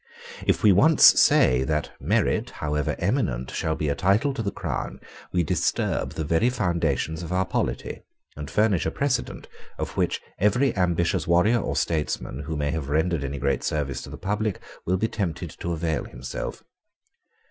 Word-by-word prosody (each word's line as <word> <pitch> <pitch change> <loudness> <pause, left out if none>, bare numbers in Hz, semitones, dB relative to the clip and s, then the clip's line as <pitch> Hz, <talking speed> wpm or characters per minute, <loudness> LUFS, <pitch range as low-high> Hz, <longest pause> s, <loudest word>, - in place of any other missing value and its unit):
If - - +2
we 105 - +7
once 150 - +7
say 65 +1 +4
that, 75 0 -1
merit, - - +1
however 75 -1 -2
eminent, 65 +1 -1
shall 80 - -1
be 75 - -2
a 70 - +2
title 100 - +2
to 135 - -3
the 100 - -1
crown, - - -4 0.3
we 90 -1 +1
disturb - - 0
the 80 - -3
very 85 +10 +2
foundations 85 - -1
of 85 - -6
our 95 +1 +1
polity, - - -3 0.3
and 75 -1 -7
furnish 105 -2 +2
a - - +2
precedent 130 - -2 0.3
of - - -4
which - - +1 0.2
every 120 +7 +2
ambitious 85 -2 +1
warrior 90 +8 +4
or - - -3
statesman 75 -4 -1
who 80 -1 -3
may 75 -1 -1
have 75 -3 -4
rendered 80 +1 +1
any 70 +1 -4
great - - 0
service 70 -4 -2
to - - -9
the - - -8
public 105 0 -2 0.3
will 90 +2 +2
be 110 +4 +1
tempted 90 -6 -3
to 85 - -3
avail 80 -2 -1
himself. 65 +2 -6
85 Hz, 170 wpm, -25 LUFS, 75-100 Hz, 0.3 s, we